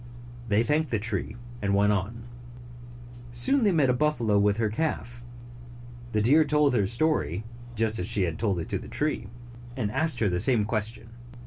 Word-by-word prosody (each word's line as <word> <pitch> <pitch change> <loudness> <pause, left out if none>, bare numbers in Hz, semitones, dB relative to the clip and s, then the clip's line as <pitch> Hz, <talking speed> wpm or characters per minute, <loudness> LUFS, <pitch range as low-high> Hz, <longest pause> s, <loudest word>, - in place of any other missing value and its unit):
They 105 +2 +3
thanked 150 +3 0
the 115 - 0
tree, 105 -1 -2 0.3
and 100 -1 0
went 105 +1 +3
on. 105 +4 -3 1.1
Soon 120 - +3
they 205 - +4
met 155 -6 +3
a - - +1
buffalo 125 -7 +1
with 100 0 +2
her 115 -1 +1
calf. 120 -2 -3 0.9
The 105 -1 +1
deer 145 +8 +5
told 150 -1 +2
her 120 - +2
the 95 - 0
story, 115 - 0 0.3
just 110 -1 0
as 90 - -2
she 100 - +1
had 85 -3 -3
told 100 -4 0
it 85 - -4
to - - -2
the - - -10
tree, 150 -7 -1 0.5
and 105 -5 -2
asked 160 +6 +1
her 110 - +1
the 90 -2 0
same 115 0 +3
question. 110 +1 -3
115 Hz, 190 wpm, -26 LUFS, 105-145 Hz, 1.1 s, deer